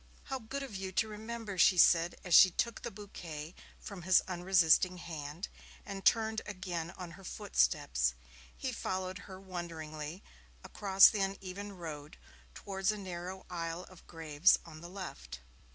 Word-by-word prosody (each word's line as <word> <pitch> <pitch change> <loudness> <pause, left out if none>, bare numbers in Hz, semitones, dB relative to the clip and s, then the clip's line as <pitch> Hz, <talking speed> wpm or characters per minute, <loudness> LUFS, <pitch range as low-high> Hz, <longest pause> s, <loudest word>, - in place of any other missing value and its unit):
'How 265 -2 -4
good 270 +5 -5
of 260 -7 -7
you 190 0 -4
to 220 - +2
remember!' 215 -2 -6
she 180 - +6
said, 170 0 +5
as 180 - -2
she 185 - +10
took 235 +6 -2
the 235 - -4
bouquet 170 -7 -8 0.3
from 200 -3 -8
his 185 +1 +5
unresisting 180 -1 +3
hand, 165 0 -6 0.4
and 195 -2 -6
turned 220 -1 +3
again 180 -4 -4
on 180 -2 -7
her 195 +3 -13
footsteps. - - +1 0.4
He - - -3
followed 185 +1 -3
her 190 0 -8
wonderingly 165 -3 -6 0.4
across 195 -1 +6
the 210 - -1
uneven 195 +1 -4
road 155 -5 -8 0.4
towards 195 -1 -2
a 210 - -5
narrow 185 -1 -6
aisle 170 0 -4
of 185 - -16
graves 160 +1 +3
on 155 -2 -11
the 175 - -9
left. 65 - -8
185 Hz, 150 wpm, -33 LUFS, 165-195 Hz, 0.4 s, she